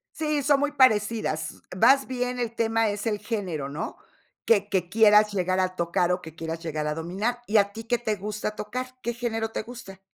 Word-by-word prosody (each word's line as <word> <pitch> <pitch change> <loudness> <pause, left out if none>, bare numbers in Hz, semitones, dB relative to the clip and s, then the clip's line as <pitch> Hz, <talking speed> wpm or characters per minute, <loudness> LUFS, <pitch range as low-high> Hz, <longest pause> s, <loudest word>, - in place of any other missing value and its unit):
Sí, 300 -2 -1
son 285 0 +4
muy 290 +1 0
parecidas. 220 - +1
Vas 270 +8 +5
bien, 250 -1 -2
el 235 -2 -2
tema 225 -1 +1
es 205 +1 -3
el 210 -2 0
género 190 - -3
¿no? 145 +3 -5 0.5
Que 205 -3 +3
que 180 -3 0
quieras 210 +1 +5
llegar 185 -1 0
a 185 0 0
tocar 175 +1 +1
o 180 - 0
que 160 -2 -11
quieras 165 0 -5
llegar 155 -2 -3
a 150 - 0
dominar. 195 +10 -2
¿Y 215 - +3
a 200 -1 +3
ti 225 +1 -8
qué 240 +1 +1
te 225 -3 -1
gusta 210 +1 -4
tocar, 245 +5 -4 0.2
qué 235 - -2
género 225 -2 -2
te 225 - -4
gusta? 220 -5 -10
210 Hz, 205 wpm, -26 LUFS, 185-235 Hz, 0.5 s, Vas